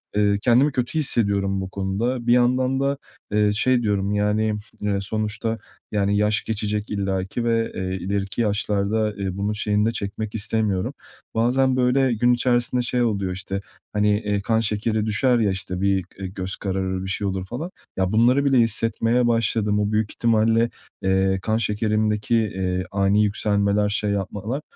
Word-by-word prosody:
Eee, 100 Hz, -1 st, +3 dB
kendimi 130 Hz, +6 st, +4 dB
kötü 125 Hz, +5 st, -1 dB
hissediyorum 100 Hz, -7 st, +2 dB
bu 95 Hz, -, -5 dB
konuda. 115 Hz, +6 st, -2 dB
Bir 120 Hz, -, +5 dB
yandan 130 Hz, +2 st, +2 dB
da, 140 Hz, +1 st, 0 dB, 0.3 s
eee, 105 Hz, 0 st, +3 dB
şey 120 Hz, +3 st, +2 dB
diyorum, 100 Hz, -1 st, 0 dB
yani, 105 Hz, +1 st, +1 dB, 0.3 s
eee, 100 Hz, -1 st, 0 dB
sonuçta, 110 Hz, +2 st, -2 dB, 0.3 s
yani, 100 Hz, -1 st, +1 dB
yaş 105 Hz, 0 st, +1 dB
geçecek 105 Hz, -1 st, -2 dB
illaki 95 Hz, +2 st, -2 dB
ve, 115 Hz, -1 st, +1 dB
eee, 95 Hz, 0 st, -3 dB
ileriki 95 Hz, +3 st, -2 dB
yaşlarda, 105 Hz, 0 st, 0 dB
eee, 95 Hz, -2 st, -4 dB
bunun 100 Hz, +2 st, -1 dB
şeyini 105 Hz, 0 st, +1 dB
de 115 Hz, -, +2 dB
çekmek 105 Hz, 0 st, -4 dB
istemiyorum. 105 Hz, -3 st, 0 dB, 0.4 s
Bazen, 130 Hz, +3 st, +2 dB
böyle, 130 Hz, 0 st, +2 dB
gün 120 Hz, +2 st, +3 dB
içerisinde 120 Hz, 0 st, +1 dB
şey 125 Hz, 0 st, 0 dB
oluyor, 100 Hz, -5 st, -1 dB
işte, 95 Hz, +1 st, -4 dB, 0.3 s
hani, 105 Hz, 0 st, +2 dB
eee, 105 Hz, -2 st, -1 dB
kan 110 Hz, +2 st, +1 dB
şekeri 110 Hz, 0 st, 0 dB
düşer 120 Hz, +3 st, +2 dB
ya, 105 Hz, -3 st, +2 dB
işte, 90 Hz, 0 st, -3 dB
bir, 95 Hz, -2 st, +1 dB
eee, 95 Hz, -, -4 dB
göz 95 Hz, 0 st, -4 dB
kararır, 95 Hz, -1 st, -2 dB
bir -, -, -5 dB
şey 100 Hz, +1 st, -1 dB
olur 95 Hz, -1 st, -3 dB
falan. 155 Hz, -, -6 dB, 0.3 s
Ya, 95 Hz, -1 st, 0 dB
bunları 125 Hz, +6 st, +3 dB
bile 135 Hz, -2 st, +3 dB
hissetmeye 115 Hz, +2 st, +2 dB
başladım. 110 Hz, -2 st, +1 dB
O 105 Hz, 0 st, 0 dB
büyük 110 Hz, -1 st, 0 dB
ihtimalle, 115 Hz, 0 st, +2 dB, 0.3 s
eee, 95 Hz, 0 st, +2 dB
kan 110 Hz, +3 st, 0 dB
şekerimdeki, 105 Hz, 0 st, 0 dB
eee, 95 Hz, -4 st, -1 dB
ani 100 Hz, +1 st, +2 dB
yükselmeler, 105 Hz, 0 st, +1 dB
şey 105 Hz, 0 st, 0 dB
yapmalar, 105 Hz, +7 st, -3 dB
105 Hz, 160 wpm, -23 LUFS, 100-115 Hz, 0.4 s, Bir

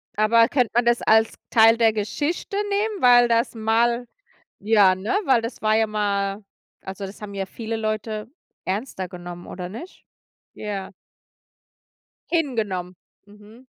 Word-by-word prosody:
aber 230 Hz, +2 st, +4 dB
könnte 250 Hz, -4 st, +1 dB
man 240 Hz, 0 st, +2 dB
das 240 Hz, 0 st, +2 dB
als 220 Hz, 0 st, +3 dB, 0.2 s
Teil 225 Hz, 0 st, +6 dB
der 225 Hz, -1 st, +4 dB
Geschichte 290 Hz, -, -3 dB
nehmen, 410 Hz, -1 st, -1 dB
weil 245 Hz, -1 st, +6 dB
das 235 Hz, +1 st, +1 dB
mal 235 Hz, +2 st, +1 dB, 0.5 s
ja, 205 Hz, -3 st, +4 dB
ne, 190 Hz, +4 st, -6 dB, 0.2 s
weil 255 Hz, -4 st, +3 dB
das 230 Hz, +2 st, -6 dB
war 215 Hz, 0 st, +3 dB
ja 220 Hz, 0 st, +3 dB
mal 200 Hz, -1 st, -2 dB, 0.4 s
also, 195 Hz, +1 st, -7 dB
das 195 Hz, -, -12 dB
haben 205 Hz, -1 st, -7 dB
ja 195 Hz, -1 st, -3 dB
viele 225 Hz, +3 st, -5 dB
Leute 215 Hz, 0 st, -3 dB, 0.4 s
ernster 190 Hz, -1 st, -4 dB
genommen 175 Hz, -1 st, -9 dB
oder 180 Hz, -1 st, -7 dB
nicht? 240 Hz, -, -10 dB, 0.5 s
Ja. 200 Hz, -3 st, -5 dB, 1.4 s
Hingenommen, 215 Hz, -, -2 dB, 0.3 s
mhm. 210 Hz, +5 st, -17 dB
220 Hz, 140 wpm, -23 LUFS, 200-235 Hz, 1.4 s, Teil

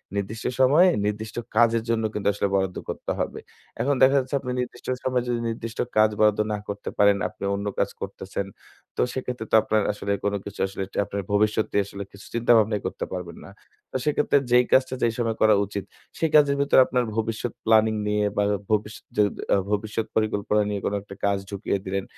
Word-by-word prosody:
নির্দিষ্ট 100 Hz, +3 st, -4 dB
সময়ে 145 Hz, +8 st, +6 dB, 0.2 s
নির্দিষ্ট 105 Hz, +1 st, -3 dB, 0.2 s
কাজের 115 Hz, 0 st, +4 dB
জন্য 115 Hz, -1 st, +1 dB
কিন্তু 105 Hz, -, -2 dB
আসলে 100 Hz, 0 st, 0 dB
বরাদ্দ 95 Hz, -1 st, 0 dB
করতে -, -, -4 dB
হবে। -, -, -2 dB, 0.4 s
এখন 140 Hz, +2 st, +2 dB
দেখা 135 Hz, +1 st, +6 dB
যাচ্ছে 130 Hz, +1 st, -3 dB
আপনি 125 Hz, -1 st, -5 dB
নির্দিষ্ট 125 Hz, 0 st, -5 dB, 0.2 s
সময়ে 125 Hz, -1 st, 0 dB
যদি 120 Hz, -1 st, 0 dB
নির্দিষ্ট 115 Hz, 0 st, -6 dB, 0.2 s
কাজ 110 Hz, 0 st, +6 dB
বরাদ্দ 105 Hz, -1 st, +4 dB
না -, -, -1 dB
করতে 100 Hz, 0 st, -5 dB
পারেন, 100 Hz, -1 st, +5 dB
আপনি -, -, -12 dB
অন্য 100 Hz, +1 st, -4 dB
কাজ -, -, +2 dB
করতেছেন 95 Hz, +1 st, -4 dB, 0.5 s
তো -, -, 0 dB
সেক্ষেত্রে 125 Hz, -3 st, -4 dB
তো -, -, +5 dB
আপনার 110 Hz, 0 st, +1 dB
আসলে 100 Hz, -1 st, -4 dB
কোন 100 Hz, -, 0 dB
কিছু 100 Hz, -, -9 dB
আসলে 95 Hz, 0 st, -5 dB, 0.2 s
আপনার 100 Hz, +1 st, -4 dB
ভবিষ্যতটি 105 Hz, +1 st, +1 dB
আসলে 100 Hz, 0 st, -7 dB
কিছু 100 Hz, -, -14 dB
চিন্তাভাবনাই 115 Hz, -3 st, +3 dB
করতে -, -, -3 dB
পারবেন 90 Hz, -2 st, -6 dB
না। -, -, -11 dB, 0.4 s
তো -, -, -12 dB
সেক্ষেত্রে 150 Hz, -1 st, +2 dB
যেই 125 Hz, 0 st, +6 dB
কাজটা 130 Hz, 0 st, +3 dB
যেই 115 Hz, -1 st, +2 dB
সময় 115 Hz, -2 st, 0 dB
করা 110 Hz, 0 st, +6 dB
উচিত, 100 Hz, 0 st, -5 dB, 0.3 s
সেই 160 Hz, -, +1 dB
কাজের 145 Hz, -2 st, +6 dB
ভেতরে 140 Hz, -1 st, +5 dB
আপনার 125 Hz, -1 st, 0 dB
ভবিষ্যৎ 115 Hz, +1 st, -2 dB
প্ল্যানিং 110 Hz, 0 st, +4 dB
নিয়ে 105 Hz, 0 st, +1 dB
বা 105 Hz, -, +3 dB, 0.3 s
ভবিষ্যৎ 105 Hz, 0 st, -1 dB
য -, -, +1 dB, 0.5 s
ভবিষ্যৎ 110 Hz, +2 st, -1 dB
পরিকল্পনা 105 Hz, -1 st, +1 dB
নিয়ে 100 Hz, -1 st, -2 dB
কোনো 100 Hz, -, 0 dB
একটা 100 Hz, 0 st, -11 dB
কাজ 100 Hz, 0 st, +2 dB
ঢুকিয়ে 100 Hz, 0 st, -2 dB
দিলেন, 95 Hz, 0 st, -2 dB
110 Hz, 185 wpm, -25 LUFS, 100-120 Hz, 0.5 s, সময়ে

